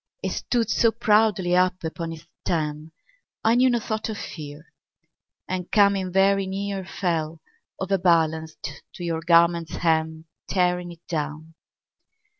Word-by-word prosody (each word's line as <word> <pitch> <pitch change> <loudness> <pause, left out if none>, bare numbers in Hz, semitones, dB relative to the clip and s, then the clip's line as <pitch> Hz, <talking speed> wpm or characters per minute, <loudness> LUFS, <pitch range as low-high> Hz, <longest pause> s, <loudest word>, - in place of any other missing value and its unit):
It - - -1
stood 230 -3 -1
so 230 +3 +4
proudly 210 -5 +2
up 185 0 +2
upon 165 +1 -4
its 165 0 -10 0.2
stem, 155 -2 -2 0.5
I 225 - +4
knew 255 +2 +5
no 240 - +2
thought 220 0 -3
of 215 - -4
fear, 150 -2 -9 0.7
And 185 -1 -4
coming 200 -3 +3
very 195 +1 +3
near 195 0 -3
Fell, 165 -4 -2 0.4
overbalanced, 160 -5 0
to 175 - -7
your 165 -1 -2
garment's 170 0 +3
hem, 160 -1 0 0.2
Tearing 180 -1 0
it 170 0 -16
down. 155 0 -4
175 Hz, 130 wpm, -24 LUFS, 160-195 Hz, 0.7 s, knew